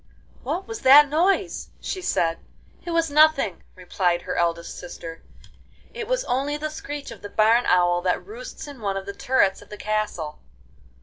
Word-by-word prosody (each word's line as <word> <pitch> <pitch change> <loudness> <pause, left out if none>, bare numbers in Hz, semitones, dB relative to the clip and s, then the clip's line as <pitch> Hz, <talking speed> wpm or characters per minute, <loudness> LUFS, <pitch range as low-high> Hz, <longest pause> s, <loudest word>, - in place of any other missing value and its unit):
'What 380 +2 -3
was 450 -1 -6
that 280 +2 +8
noise?' 345 +7 +1
she 375 - -4
said. 165 - 0 0.4
'It - - -7
was 330 -2 +1
nothing,' 300 - +4
replied 180 -1 -1
her - - -4
eldest 170 0 -1
sister; 165 -2 -9 0.7
'it 455 -3 -5
was - - 0
only 280 +4 -1
the 305 +1 -4
screech 290 -2 -7
of - - -11
the 205 - -7
barn 225 +4 +3
owl 175 -1 +3
that 180 0 -1
roosts 485 +5 -9
in 280 -5 -10
one 200 -2 -1
of 195 - -5
the 200 - -6
turrets 255 -5 +1
of - - -16
the 210 - -8
castle. 210 -9 -3
245 Hz, 175 wpm, -24 LUFS, -, 0.7 s, that